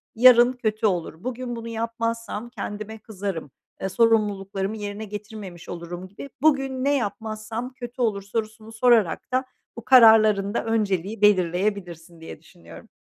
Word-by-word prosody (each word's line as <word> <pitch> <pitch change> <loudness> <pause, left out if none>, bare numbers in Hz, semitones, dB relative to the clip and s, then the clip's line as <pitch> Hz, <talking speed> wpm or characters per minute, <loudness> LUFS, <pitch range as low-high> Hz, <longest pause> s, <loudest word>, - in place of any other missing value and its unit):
yarın 245 +1 +7
kötü 220 -3 -2
olur, 175 -2 -3
bugün 250 -1 -4
bunu 230 0 -7
yapmazsam 230 0 -3
kendime 215 -1 -6
kızarım, 195 - -6 0.3
eee, 190 - -2
sorumluluklarımı 205 -2 +1
yerine 205 +1 -5
getirmemiş 205 -4 -9
olurum 175 +1 -7
gibi. 205 +9 -10
"Bugün 270 -4 +2
ne 285 +1 +2
yapmazsam 220 +3 -4
kötü 245 0 -8
olur?" 210 -4 +1
sorusunu 220 +2 -5
sorarak 225 -4 +2
da 255 +1 +1 0.3
bu 235 - -8
kararların 220 -5 +6
da 230 - -1
önceliği 210 -2 -1
belirleyebilirsin 180 -3 0
diye 160 - -9
düşünüyorum. 85 - -15
215 Hz, 135 wpm, -24 LUFS, 195-230 Hz, 0.3 s, yarın